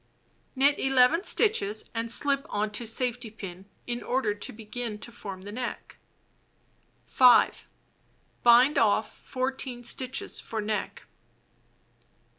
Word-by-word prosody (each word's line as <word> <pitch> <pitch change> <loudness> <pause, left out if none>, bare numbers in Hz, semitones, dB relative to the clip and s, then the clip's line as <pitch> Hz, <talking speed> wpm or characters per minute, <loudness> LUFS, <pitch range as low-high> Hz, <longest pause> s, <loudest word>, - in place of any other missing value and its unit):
Knit 280 +2 +3
11 270 +7 +3
stitches 215 - +2
and 230 0 -3
slip 275 +3 +3
on 210 +1 -2
to 225 +2 -3
safety 240 0 -2
pin, 195 -3 -10 0.2
in 240 0 -4
order 245 -4 -1
to 205 - -7
begin 220 0 -6
to 235 +3 -9
form 195 -5 -9
the 205 - -8
neck. 245 +2 -6 1.1
5. 250 -2 +4 0.7
Bind 245 +4 +5
off 215 0 +1
14 255 -1 -5
stitches 255 +2 0
for 225 - -6
neck. 210 0 -4
240 Hz, 115 wpm, -27 LUFS, 215-260 Hz, 1.1 s, Bind